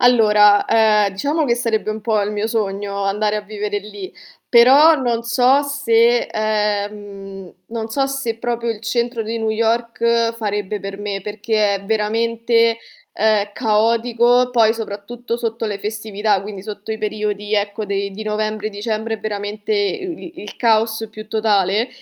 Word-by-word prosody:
Allora, 210 -4 +5
ehm, 215 -3 +3
diciamo 290 +10 -1
che 235 - +2
sarebbe 230 -3 -1
un 215 0 -5
po' 220 -1 +1
il 205 +1 -1
mio 210 +1 -2
sogno 200 -2 -2
andare 210 +2 0
a - - -2
vivere 205 0 -4
lì, 205 -2 -9 0.3
però 270 +7 +7
non 240 -5 -1
so 250 +4 +3
se 240 -4 +3
ehm, 205 -3 -3
non 225 -1 -4
se 270 -2 -1
proprio 235 0 -3
il 225 -2 -3
centro 235 0 -1
di 225 +1 -4
New 220 -1 -1
York 230 +1 +1
farebbe 205 -2 -3
per 195 0 -7
me, 200 -2 -4
perché 210 0 0
è 195 - -11
veramente, 230 +2 +1 0.4
ehm, 210 -1 +2
caotico, 235 +2 +2
poi 225 -2 +4
soprattutto 230 +2 -5
sotto 230 -1 -3
le 205 -2 -3
festività, 210 -1 -1
quindi 200 -1 -7
sotto 210 +1 -6
i 220 - -5
periodi, 210 -1 -2
ecco, 205 +1 -1
de 200 0 -2
di 200 +3 -7
novembre, 215 0 -2
dicembre 215 +2 -3
è - - -7
veramente 210 0 -4
i 210 - -2
i - - -8
il 205 - -9
caos 225 -1 +1
più 215 0 -10
totale. 215 0 +1
215 Hz, 155 wpm, -19 LUFS, 205-230 Hz, 0.4 s, però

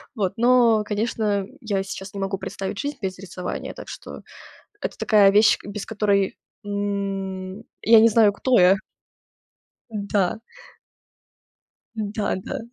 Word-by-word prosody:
Вот, 195 -4 -1
но, 235 -2 +4
конечно, 210 -2 -1
я 205 -5 -2
сейчас 195 +1 -8
не 200 - -6
могу 195 0 -2
представить 195 +1 -5
жизнь 290 +1 -3
без 185 -1 -4
рисования. 185 -1 -6
Так - - -10
что - - -9 0.6
это - - -4
такая 205 -3 +5
вещь, 210 +2 +5
без 205 0 -6
которой, 200 -3 +1 0.3
м, 195 -1 -3 0.2
я 225 -1 +7
не 225 - +7
знаю, 215 -2 +4
кто 250 +3 +2
я. 180 +2 +6 1.2
Да. 200 -2 -1 1.6
Да, 210 0 -2
да. 250 +8 -5
205 Hz, 125 wpm, -23 LUFS, 195-220 Hz, 1.6 s, я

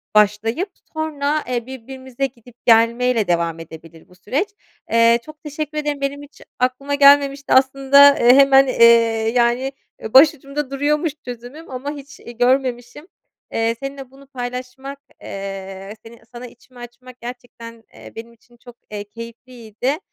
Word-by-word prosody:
başlayıp 215 - +2 0.2
sonra, 305 -1 -2
eee, 240 -2 -3
birbirimize 260 +1 -6
gidip 245 -2 -12
gelmeyle 230 -1 +3
devam 170 -1 -1
edebilir 165 0 -13
bu 180 - -21
süreç. 265 - -2 0.4
Eee, 230 0 +4
çok 310 0 -14
teşekkür 305 0 -6
ederim, 295 -2 -3
benim 280 +1 -3
hiç 290 - -17 0.2
aklıma 255 +3 -1
gelmemişti. 280 0 +4
Aslında, 275 +2 +5
e, 245 +2 +6
hemen, 275 0 +6
eee, 235 -2 +4 0.5
yani, 245 +2 +1 0.4
başucumda 280 0 +3
duruyormuş 295 +3 0
çözümüm 245 +6 -10
ama 260 +3 -5
hiç, 280 -1 -11
iii, 235 -1 -12
görmemişim. 250 +3 -1 0.5
Eee, 225 0 0
seninle 275 -1 -8
bunu 275 +1 -18
paylaşmak, 255 +1 -7 0.2
eee, 195 0 -8
seni 230 0 -14
sana 245 0 -9
içimi 245 +1 -19
açmak 245 +1 -13
gerçekten, 235 -2 -10
eee, - - -13
benim 230 +1 -10
için 240 +1 -26
çok, 245 0 -15 0.2
eee, 205 -1 -5
keyifliydi. 230 +4 -6
250 Hz, 135 wpm, -19 LUFS, 230-275 Hz, 0.5 s, e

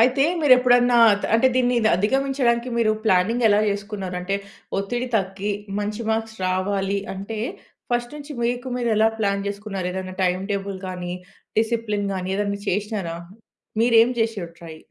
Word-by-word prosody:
అయితే 255 +4 +4 0.2
మీరెప్పుడన్నా 250 -3 +5 0.4
అంటే 245 +3 +5
దీన్ని 250 -1 +2 0.2
అధిగమించడానికి 250 +2 +1
మీరు 215 -2 +3
ప్లానింగ్ 220 +4 +2
ఎలా 205 0 +4
జేసుకున్నారు? 200 -2 -4
అంటే 195 +2 -1 0.4
ఒత్తిడి 240 +6 -2
తగ్గి, 195 +1 -2 0.3
మంచి 210 +2 -3
మార్క్స్ 220 0 -2
రావాలి 195 +1 0 0.2
అంటే, 200 +3 -6 0.5
ఫస్ట్ 240 +2 -1
నుంచి 295 0 -8
మీకు 245 +2 -1
మీరెలా 225 -3 +3
ప్లాన్ 200 -2 0
జేసుకున్నారు? 200 -2 -4
ఏదైనా 185 0 -5
టైమ్ 180 +1 0
టేబుల్ 195 -1 -3
కానీ, 180 -1 -5 0.5
డిసిప్లిన్ 220 -3 0
గాని 185 0 -3
ఏదన్నా 200 0 -1
జేసినారా? 200 -3 -2 0.7
మీరేం 230 0 +5
జేసిర్రు 215 -6 -1
ట్రై? 165 -2 -9
210 Hz, 135 wpm, -23 LUFS, 195-240 Hz, 0.7 s, మీరెప్పుడన్నా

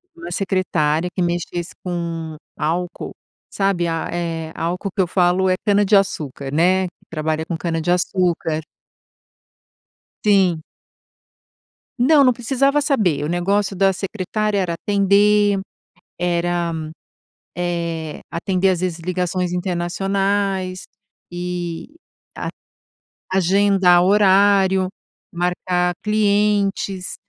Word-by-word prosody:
Uma 360 +2 -8
secretária 180 -4 0
que 185 - +1
mexesse 175 0 -3
com 165 -3 -4 0.2
álcool, 170 +4 -3 0.3
sabe 195 -3 0
a, 165 -1 -2
eh, 165 -2 -3
álcool 180 +4 -3
que 200 - +2
eu 180 - +1
falo 180 +1 +2
é 185 - +3
cana-de-açúcar, 195 - +1
né. 185 +4 +3
Que 175 - -19
trabalha 155 0 -2
com 170 - -3
cana-de-açúcar. 170 -1 0 1.6
Sim. 190 -6 +3 1.4
Não, 280 +4 +5
não 255 -2 +5
precisava 275 +4 +1
saber. 205 - +1
O - - -1
negócio 195 +3 0
da 195 +1 +3
secretária 210 +2 -2
era 180 -3 0
atender, 205 +2 +3 0.6
era, 175 -1 0 0.8
eh, 170 -3 -3
atender 190 +2 +1
às 180 - 0
vezes 180 -2 -2
ligações 180 +1 -2
internacionais 190 +1 -1 0.5
e 175 - -5 0.4
a - - -4 0.8
agendar 190 -1 +4
horário, 195 -1 +4 0.4
marcar 180 0 0
clientes, 205 -2 +1
180 Hz, 95 wpm, -20 LUFS, 175-200 Hz, 1.6 s, Não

